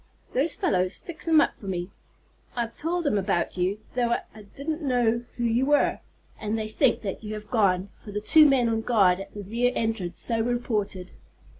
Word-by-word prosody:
Those 290 Hz, +5 st, +2 dB
fellows 185 Hz, 0 st, 0 dB
fix 340 Hz, -1 st, -8 dB
'em 320 Hz, -1 st, +6 dB
up -, -, -1 dB
for 200 Hz, -, -10 dB
me. 180 Hz, 0 st, -3 dB, 0.6 s
I've 235 Hz, -1 st, -3 dB
told 340 Hz, +2 st, -1 dB
'em 210 Hz, -8 st, +2 dB
about 190 Hz, -3 st, -1 dB
you, 185 Hz, +3 st, 0 dB, 0.2 s
though 240 Hz, -1 st, +1 dB, 0.2 s
I 215 Hz, -, -12 dB
didn't 310 Hz, +4 st, -3 dB
know 240 Hz, -4 st, +1 dB
who 240 Hz, -, -2 dB
you 235 Hz, +3 st, +2 dB
were, 290 Hz, 0 st, +3 dB, 0.4 s
and 215 Hz, +1 st, -2 dB
they 215 Hz, -1 st, -3 dB
think 230 Hz, +1 st, +1 dB, 0.2 s
you 215 Hz, -1 st, -5 dB
have 210 Hz, 0 st, -10 dB
gone, 195 Hz, -5 st, +2 dB
for 210 Hz, -, -9 dB
the 205 Hz, -, -2 dB
two 300 Hz, +8 st, +7 dB
men 255 Hz, -3 st, +3 dB
on 225 Hz, -1 st, 0 dB
guard 195 Hz, -6 st, +3 dB
at 195 Hz, -, -8 dB
the 205 Hz, -, -6 dB
rear 235 Hz, +5 st, 0 dB
entrance 220 Hz, -6 st, -2 dB
so 230 Hz, -2 st, -1 dB
reported. 215 Hz, -6 st, -2 dB
225 Hz, 190 wpm, -26 LUFS, 200-250 Hz, 0.6 s, two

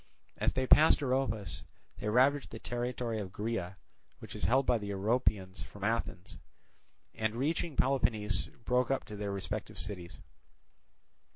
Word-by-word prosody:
As -, -, +1 dB
they 130 Hz, -, 0 dB
passed 150 Hz, +2 st, +6 dB
Oropus 125 Hz, -, 0 dB, 0.4 s
they 105 Hz, -, -2 dB
ravaged 135 Hz, +5 st, +3 dB
the 115 Hz, -, -7 dB
territory 120 Hz, -1 st, -2 dB
of 95 Hz, -3 st, -5 dB
Graea, 105 Hz, -3 st, -3 dB, 0.4 s
which -, -, -10 dB
is -, -, -2 dB
held 130 Hz, +3 st, +3 dB
by 120 Hz, -2 st, +3 dB
the 105 Hz, -1 st, -5 dB
Oropians 100 Hz, -2 st, 0 dB
from 100 Hz, -, -11 dB
Athens, 100 Hz, -4 st, -2 dB, 0.7 s
and 110 Hz, 0 st, -1 dB
reaching 155 Hz, +4 st, -1 dB
Peloponnese 110 Hz, -8 st, +1 dB, 0.2 s
broke 125 Hz, -1 st, +2 dB
up 135 Hz, -1 st, 0 dB
to 105 Hz, -, -8 dB
their 100 Hz, -1 st, -3 dB
respective 100 Hz, -1 st, -4 dB
cities. 90 Hz, -5 st, -6 dB
115 Hz, 145 wpm, -32 LUFS, 100-130 Hz, 0.7 s, passed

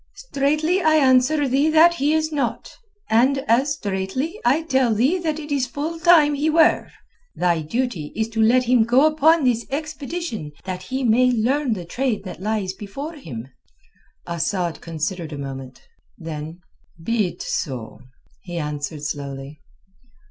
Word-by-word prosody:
"Straightly 310 Hz, -, 0 dB
I 315 Hz, -2 st, +4 dB
answer 275 Hz, +1 st, +4 dB
thee 275 Hz, +4 st, +2 dB
that 320 Hz, +2 st, +6 dB
he 295 Hz, -2 st, 0 dB
is 315 Hz, 0 st, 0 dB
not. 270 Hz, -6 st, -3 dB, 0.3 s
And, 250 Hz, +5 st, +3 dB
as 265 Hz, +6 st, +3 dB
straightly, 205 Hz, -, -3 dB
I 275 Hz, +7 st, +2 dB
tell 260 Hz, -7 st, +2 dB
thee 270 Hz, -, +2 dB
that 320 Hz, -3 st, -2 dB
it 295 Hz, -1 st, -8 dB
is 270 Hz, -3 st, +1 dB
full 310 Hz, +6 st, -4 dB
time 325 Hz, -4 st, +5 dB
he 290 Hz, +2 st, 0 dB
were. 320 Hz, +1 st, +3 dB, 0.5 s
Thy 175 Hz, -2 st, +1 dB
duty 180 Hz, -2 st, -3 dB
is 220 Hz, 0 st, 0 dB
to 225 Hz, 0 st, -1 dB
let 245 Hz, +3 st, +4 dB
him 250 Hz, -1 st, +3 dB
go 245 Hz, +6 st, +4 dB
upon 310 Hz, +1 st, +4 dB
this 240 Hz, -3 st, +2 dB
expedition 295 Hz, -, -5 dB
that 185 Hz, -1 st, -5 dB
he 260 Hz, +8 st, -4 dB
may 250 Hz, +2 st, +4 dB
learn 250 Hz, +3 st, +1 dB
the 180 Hz, -5 st, -6 dB
trade 230 Hz, +2 st, -2 dB
that 185 Hz, -2 st, -8 dB
lies 205 Hz, -2 st, -2 dB
before 275 Hz, +12 st, -7 dB
him." 135 Hz, -, -8 dB, 0.8 s
Asad 170 Hz, 0 st, -2 dB
considered 165 Hz, +1 st, -4 dB
a -, -, -6 dB
moment. 135 Hz, -2 st, -7 dB, 0.4 s
Then: 160 Hz, +1 st, -7 dB, 0.4 s
"Be 220 Hz, 0 st, +1 dB
it -, -, -8 dB
so," 125 Hz, -7 st, -4 dB, 0.4 s
he 175 Hz, -2 st, -7 dB
answered 150 Hz, -1 st, -4 dB
slowly. 140 Hz, 0 st, -6 dB
245 Hz, 155 wpm, -22 LUFS, 180-295 Hz, 0.8 s, that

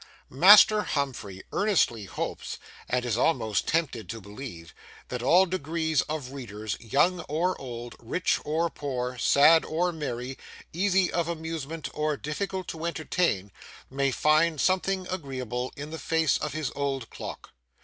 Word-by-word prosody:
Master 205 Hz, +8 st, +8 dB
Humphrey 120 Hz, -, -3 dB
earnestly 170 Hz, -, +2 dB
hopes, -, -, -5 dB, 0.3 s
(and 125 Hz, 0 st, 0 dB
is 115 Hz, -2 st, 0 dB
almost 115 Hz, -9 st, +1 dB
tempted 140 Hz, -, -1 dB
to 115 Hz, +2 st, -5 dB
believe,) 100 Hz, -5 st, -9 dB, 0.4 s
that 125 Hz, -1 st, -4 dB
all 175 Hz, +9 st, +5 dB
degrees 160 Hz, -4 st, 0 dB
of 150 Hz, -5 st, -4 dB
readers, 110 Hz, -6 st, -5 dB
young 145 Hz, -, +2 dB
or 175 Hz, +5 st, +1 dB
old, 120 Hz, -2 st, -7 dB
rich 125 Hz, +10 st, 0 dB
or 165 Hz, +2 st, 0 dB
poor, 125 Hz, -3 st, -4 dB
sad 155 Hz, +6 st, +6 dB
or 175 Hz, +3 st, 0 dB
merry, 130 Hz, -5 st, -5 dB, 0.3 s
easy 190 Hz, +1 st, +2 dB
of 170 Hz, -1 st, 0 dB
amusement 160 Hz, -2 st, -4 dB
or 150 Hz, -1 st, -1 dB
difficult 185 Hz, +6 st, -4 dB
to 160 Hz, 0 st, -6 dB
entertain, 155 Hz, -, -1 dB, 0.4 s
may 140 Hz, +1 st, +1 dB
find 155 Hz, +3 st, +3 dB
something 190 Hz, +2 st, +1 dB
agreeable 130 Hz, -7 st, -4 dB
in 145 Hz, +2 st, -7 dB
the 160 Hz, -, -5 dB
face 160 Hz, -1 st, +1 dB
of 150 Hz, -, -3 dB
his 155 Hz, -4 st, -2 dB
old 135 Hz, -4 st, -2 dB
clock. -, -, -8 dB
150 Hz, 140 wpm, -27 LUFS, 125-170 Hz, 0.4 s, Master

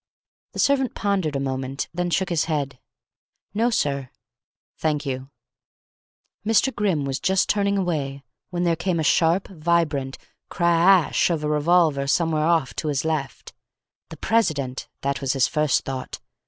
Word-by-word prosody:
The -, -, -9 dB
servant 270 Hz, -2 st, +2 dB
pondered 190 Hz, -7 st, 0 dB
a -, -, 0 dB
moment, 135 Hz, 0 st, -3 dB
then 175 Hz, +1 st, -1 dB
shook 185 Hz, +3 st, 0 dB
his 170 Hz, -3 st, +1 dB
head. 140 Hz, -5 st, -2 dB, 0.7 s
"No, 230 Hz, +3 st, +2 dB
sir." 140 Hz, -, -1 dB, 0.7 s
"Thank 150 Hz, -2 st, 0 dB
you." 130 Hz, 0 st, -4 dB, 1.1 s
Mr. 225 Hz, +5 st, +2 dB
Grimm 185 Hz, -9 st, 0 dB
was 135 Hz, -1 st, -2 dB
just 190 Hz, +2 st, +2 dB
turning 200 Hz, -1 st, +1 dB
away, 145 Hz, -7 st, -2 dB, 0.3 s
when 175 Hz, -1 st, -2 dB
there 170 Hz, -1 st, +2 dB
came 180 Hz, +1 st, -1 dB
the 160 Hz, -, 0 dB
sharp, 165 Hz, +5 st, +3 dB
vibrant 155 Hz, -6 st, 0 dB, 0.3 s
cra 170 Hz, +1 st, +4 dB
a -, -, -10 dB
sh! -, -, +3 dB
of 165 Hz, -3 st, -1 dB
a -, -, 0 dB
revolver, 150 Hz, -2 st, +2 dB
somewhere 155 Hz, 0 st, +1 dB
off 165 Hz, -6 st, +2 dB
to 155 Hz, -, -2 dB
his 145 Hz, 0 st, -1 dB
left. 155 Hz, -4 st, -3 dB, 0.6 s
The 160 Hz, -, -9 dB
president! 145 Hz, -, 0 dB
That 140 Hz, 0 st, -2 dB
was 135 Hz, -1 st, 0 dB
his 135 Hz, -2 st, +3 dB
first 150 Hz, -3 st, +1 dB
thought. 130 Hz, -1 st, -5 dB
160 Hz, 155 wpm, -23 LUFS, 140-180 Hz, 1.1 s, cra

